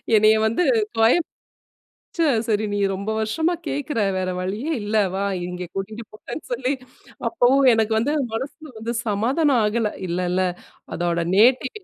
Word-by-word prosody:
என்னய 215 +1 +6
வந்து 230 +11 +1 0.3
தொயந் 230 +9 +4 0.9
ச்சே! 335 -1 +2 0.2
சரி 215 -1 +1
நீ 205 - -1
ரொம்ப 200 +3 -4
வருஷமா 320 +11 0
கேட்குற 285 -3 -3 0.2
வேற 185 0 -1
வழியே 210 - -3
இல்ல 210 +1 -1 0.2
வா! 195 - -1 0.2
இங்க 180 0 -5
கூட்டிட்டு 215 +4 -5
போறன்னு 215 +8 -8
சொல்லி 255 +2 0 0.6
அப்பவும் 275 -3 +3
எனக்கு 225 -1 +1
வந்து 255 +7 0 0.2
மனசுல 290 +5 -6
வந்து 225 +2 -3
சமாதானம் 250 +6 +2
ஆகல. 210 0 0 0.2
இல்லல்ல. 180 +1 0 0.5
அதோட 170 0 0
நேட்டிவ் 255 - +3
225 Hz, 135 wpm, -22 LUFS, 205-265 Hz, 0.9 s, என்னய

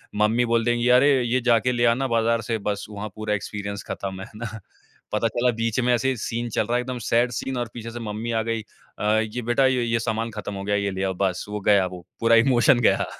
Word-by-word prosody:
Mummy 110 +3 +2
बोल 115 -1 +1
देंगी 120 0 +1
"अरे! 125 +3 +6
ये 125 +2 +1
जाके 120 0 +3
ले 120 -1 +1
आना 135 +3 -1
बाज़ार 115 -1 +1
से" 115 - +1
बस 100 -1 -3
वहाँ 105 0 -6
पूरा 110 -1 -2
एक्सपीरियंस 100 -1 -4
खत्म, 95 -1 -5
है 100 - -8
ना? 110 -1 -6 0.5
पता 105 +2 +1
चला 120 +2 +1
बीच 115 0 -1
में 125 0 +2
ऐसे 120 +2 +1
ही 130 - -1
सीन 120 +1 -3
चल 105 - 0
रहा 120 - 0
है, 125 - +2
एकदम 125 0 -5
सैड 120 +1 +3
सीन 135 -1 -4
और 120 -2 -2
पीछे 115 -1 -7
से 120 - -7
मम्मी 110 +1 -4
आ 115 -1 +1
गयी 115 -1 -1 0.4
अ, - - -4 0.2
"ये 110 +2 -3
बेटा 120 +3 +2
य 130 -1 +2
ये 115 - +2
सामान 115 0 -2
खत्म 105 -1 -6
हो 95 - -5
गया 100 +1 0
है, 100 - 0
ये 100 - -1
ले 95 0 -3
आओ 95 -1 0
बस।" 90 -2 -1
वो 105 - -3
गया 100 -2 +4
वो, 90 -1 -8
पूरा 115 0 +4
इमोशन 120 +1 +4
गया। - - +3
115 Hz, 255 wpm, -24 LUFS, 105-120 Hz, 0.5 s, अरे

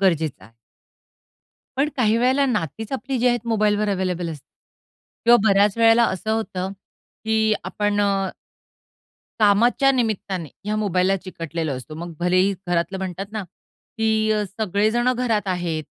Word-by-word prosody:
गरजेचं 160 -6 0
आहे. 110 - -18 1.3
पण 290 +2 +2
काही 225 -2 +3
वेळेला 260 +3 +3
नातीच 215 - -3
आपली 265 0 -2
जी 250 - +3
आहेत 240 -1 0
मोबाईलवर 210 -2 +1
अव्हेलेबल 180 -3 -1
असते. 150 -4 -9 0.8
किंवा 240 +1 +7
बऱ्याच 200 +2 +3
वेळेला 230 +1 +5
असं 205 +4 -3
होतं 190 -4 -2 0.5
की, 220 -1 +2
आपण 205 0 -1
अ, 195 -2 +1 1.1
कामाच्या 230 +6 +4
निमित्ताने 200 - -2 0.2
ह्या 210 - -1
मोबाईलला 195 -2 +1
चिकटलेलो 165 -4 -5
असतो. 155 +4 -9
मग, 170 +1 -7
भलेही 185 +3 +2
घरातलं 175 +2 0
म्हणतात 190 0 -4
ना 215 -2 -4
की 220 +4 -3
अ, 210 -1 +1
सगळे 205 +1 0
जण 240 +2 +2
घरात 235 -4 0
आहेत 175 -4 -2
205 Hz, 140 wpm, -22 LUFS, 180-225 Hz, 1.3 s, किंवा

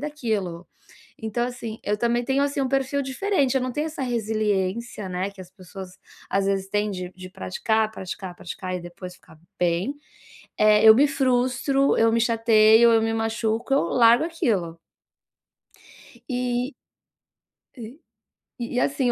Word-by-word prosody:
daquilo. 220 - -3 0.6
Então, 240 +2 -1
assim, 235 -3 -6
eu 210 - 0
também 240 +1 0
tenho, 270 +2 +1
assim, 285 0 -1
um 265 - 0
perfil 270 +1 0
diferente, 275 0 0
eu - - +2
não 255 - -2
tenho 300 +5 -2
essa 310 -3 -5
resiliência, 215 -3 -2
né, 185 +2 -3
que 200 -1 -14
as 180 -1 -11
pessoas, 185 0 -10 0.4
às 195 0 +1
vezes 195 -1 -1
têm 210 +1 0
de 180 -2 -5
de 185 0 -10
praticar, 215 +3 -1
praticar, 190 -2 -7
praticar 185 +1 -6
e - - -6
depois 175 +1 -9
ficar 160 -3 -20 0.2
bem. 175 +9 0 0.6
Eh, 215 0 +5
eu 220 - +10
me 275 +5 +5
frustro, 270 0 +1
eu 225 0 +4
me 230 - +2
chateio, 225 0 +5
eu 225 - +4
me 225 0 0
machuco, 225 +2 -2
eu 275 - +3
largo 235 - +4
aquilo. 200 - -2 1.5
Eh 250 +1 -1 1.0
aí 230 -1 -8 0.5
e - - -69 0.3
e - - +2
,assim, 265 -2 +1
225 Hz, 155 wpm, -24 LUFS, 195-255 Hz, 1.5 s, eu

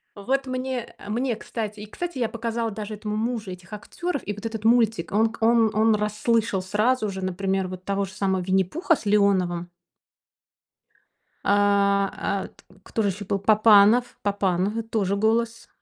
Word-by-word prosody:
Вот 270 +7 -1
мне, 255 -2 -4
э, 205 - -10
мне, 240 +1 0
кстати 215 -1 -5
И, 210 - -8
кстати, 345 +3 -5
я 235 - 0
показала 230 0 -2
даже 215 0 -6
этому 210 0 -4
мужу 225 -2 -2
этих 180 +2 -11
актеров 340 - -4
и 210 - -1
вот 205 +3 -10
этот 220 -1 -4
мультик. 225 -5 +2
Он 220 +2 +2
к 230 - -13
он 225 -1 +4
он 220 +1 +3
расслышал 210 -1 0
сразу 215 +4 +1
же, 190 -1 -5
например, 190 0 -1
вот 185 0 -8
того 200 0 -1
же 190 - -11
самого 190 -2 0
Винни-Пуха 190 - +1
с 220 - -11
Леоновым. 185 -4 +2 1.7
А, 200 -1 +3
а, 200 -1 -2
т - - -22 0.2
Кто 225 - -2
же 205 - +1
еще 200 +1 -5
был? 195 +1 -1
Папанов, 215 +3 +5
Папанов 200 +1 0
и - - 0
тоже 205 -3 -1
голос, 225 +2 0
210 Hz, 170 wpm, -24 LUFS, 200-230 Hz, 1.7 s, Папанов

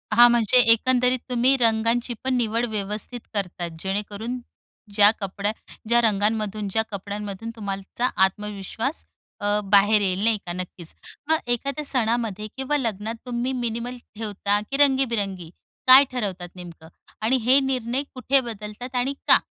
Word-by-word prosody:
हां 240 +1 +9
म्हणजे 235 0 +3
एकंदरीत 250 +2 +3
तुम्ही 250 +2 +3
रंगांचीपण 235 +2 +1
निवड 230 0 0
व्यवस्थित 210 +3 -3
करतात, 180 -4 -3
जेणेकरून 205 +5 -4 0.5
ज्या 205 -1 +7
कपड्या, 200 +1 -2 0.4
ज्या 235 +1 +4
रंगांमधून, 215 -1 0
ज्या 220 +2 +2
कपड्यांमधून 205 +2 -5
तुम्हाचा 200 +3 -3 0.2
आत्मविश्वास 210 - -4 0.3
अ, 205 0 +1
बाहेर 205 +2 +4
येईल 190 0 0
नाही 225 -1 +3
का? 175 - -4
नक्कीच. 180 -2 -6 0.4
मग 320 - +4 0.2
एखाद्या 280 +5 -3
सणामध्ये 225 -5 0
किंवा 270 +2 0
लग्नात 225 -3 -3
तुम्ही 245 +1 -2
मिनिमल 240 0 -3 0.2
ठेवता, 205 -1 -1
की 275 - 0
रंगीबिरंगी. 230 - +1 0.4
काय 260 +2 +10
ठरवतात 190 -8 -4
नेमकं? 170 -3 -11 0.3
आणि 235 +4 +2
हे 260 +3 +6
निर्णय 260 0 -1
कुठे 260 +2 +2
बदलतात 215 +4 -8
आणि 250 +3 0
का? - - +8
220 Hz, 130 wpm, -24 LUFS, 200-250 Hz, 0.5 s, काय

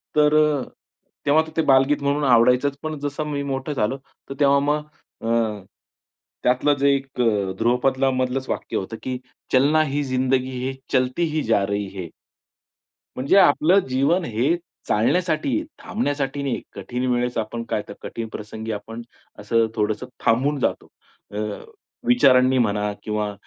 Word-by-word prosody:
तर 150 0 +4
अ, 150 -2 +3 0.6
तेव्हा 145 +2 +5
तर 160 - -10
ते - - +4
बालगीत 135 +2 +3
म्हणून 145 +1 +1
आवडायचंच 125 +3 +4
पण 155 -1 -3
जसं 145 +1 -3
मी 140 0 -2
मोठं 135 +1 -3
झालो, 125 +1 0 0.3
तर - - -4
तेव्हा 140 -1 +5
मग 150 +1 0 0.4
अ, 115 -2 0 0.8
त्यातलं 130 +4 +3
जे 140 +1 +3
एक 135 -2 -4
अ, 105 -5 +1
ध्रुवपदलामधलंच 130 +2 +1
वाक्य - - -3
होतं 105 +4 -5
की 130 -1 -3 0.4
चलना 145 +5 +4
ही 145 0 -1
जिंदगी 130 0 0
ही, 130 +1 -3 0.2
चलती 130 +5 +1
ही 155 - +1
जा 105 -3 +2
रही 100 0 -2
है. 90 -3 -5 1.1
म्हणजे 135 +10 +2
आपलं 175 +2 +5
जीवन 140 +8 +2
हे 125 +8 +1 0.3
चालण्यासाठी 155 - +1
आहे, 315 - -3
थांबण्यासाठी 145 - -2
नाहीये. 135 -3 -2
कठीण 125 +1 -4
वेळेस 120 0 0
आपण 115 +2 -3
काय 105 - 0
तर - - -7
कठीण 115 -1 -5
प्रसंगी 110 +1 -6
आपण 115 +2 -6 0.4
असं 115 +2 +2
थोडंसं 110 +2 -1 0.2
थांबून 135 +5 +2
जातो. - - -1 0.4
अ, 105 - -6 0.7
विचारांनी 130 - +5
म्हणा 105 -3 +1
किंवा 105 -1 -2
130 Hz, 150 wpm, -22 LUFS, 115-145 Hz, 1.1 s, तेव्हा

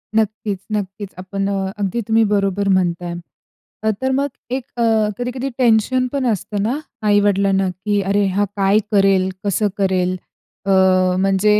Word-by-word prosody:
नक्कीच, 215 -2 0
नक्कीच. 200 -1 -3
आपण 195 +2 -3
अ, 195 -1 -1
अगदी 205 +3 -1
तुम्ही 225 0 +4
बरोबर 200 0 0
म्हणताय. 175 -2 +1 0.7
अ, 220 - +2
तर 260 0 +1
मग 280 +2 +1 0.2
एक 260 -1 -2
अ, 235 - +1 0.3
कधी-कधी 250 +2 -3
टेन्शन 250 +1 +3
पण 275 -2 -1
असतं 205 -1 -1
ना, 255 +7 -1 0.3
आई-वडिलांना, 200 -2 +3
की 200 +3 -1
"अरे 200 +1 +1
हा 205 0 +2
काय 200 +1 +3
करेल? 195 -2 +3
कसं 205 +1 +1
करेल?" 185 -2 +1 0.5
अ, 195 - +1 0.5
म्हणजे 195 +2 +3
200 Hz, 145 wpm, -19 LUFS, 195-220 Hz, 0.7 s, तुम्ही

